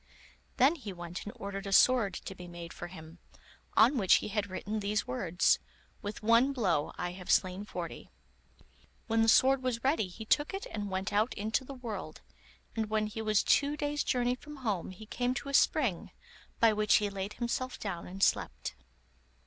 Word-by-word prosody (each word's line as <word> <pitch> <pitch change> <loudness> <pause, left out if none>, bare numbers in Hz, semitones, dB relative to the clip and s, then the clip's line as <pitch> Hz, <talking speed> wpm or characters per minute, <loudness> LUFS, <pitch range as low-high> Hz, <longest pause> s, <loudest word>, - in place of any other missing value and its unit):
Then 275 +7 +5
he 225 -9 -7
went 175 -1 -7
and 210 - -6
ordered 200 -2 -6
a - - -4
sword 215 -3 +5
to - - -6
be 180 -1 -10
made 170 -1 -8
for 175 - -7
him, 165 -1 -12 0.6
on 245 +5 +6
which 190 -3 +6
he - - -1
had 205 -1 -1
written 205 +3 -3
these 205 0 -1
words: 165 +8 +2 0.4
'With 210 +1 -6
one 230 +5 +4
blow 180 - +1
I 175 - -2
have 180 0 -10
slain 185 +2 +2
forty.' - - -6 1.0
When 225 0 +2
the 225 - +4
sword 260 +4 +5
was 250 -3 -2
ready 265 - +2
he 215 +5 -9
took 295 - +2
it 395 +4 -5
and 205 -1 -4
went 190 +2 -3
out 215 +4 +2
into 220 +5 -1
the 275 +1 -9
world, 215 -10 -6 0.5
and 220 -2 -1
when 215 0 +1
he 215 +1 -5
was 215 -1 +2
two 290 +1 +3
days' 290 0 -1
journey 245 -1 +1
from 295 +4 -9
home 200 -6 -1
he 185 +4 -10
came 245 +3 -1
to 280 - -4
a - - -5
spring, 255 - +2 0.5
by 230 -2 +5
which 210 0 +3
he 210 - +3
laid 195 +1 -4
himself 250 +2 -3
down 185 -5 -5
and 195 +2 -3
slept. 60 0 0
215 Hz, 190 wpm, -31 LUFS, 190-245 Hz, 1.0 s, on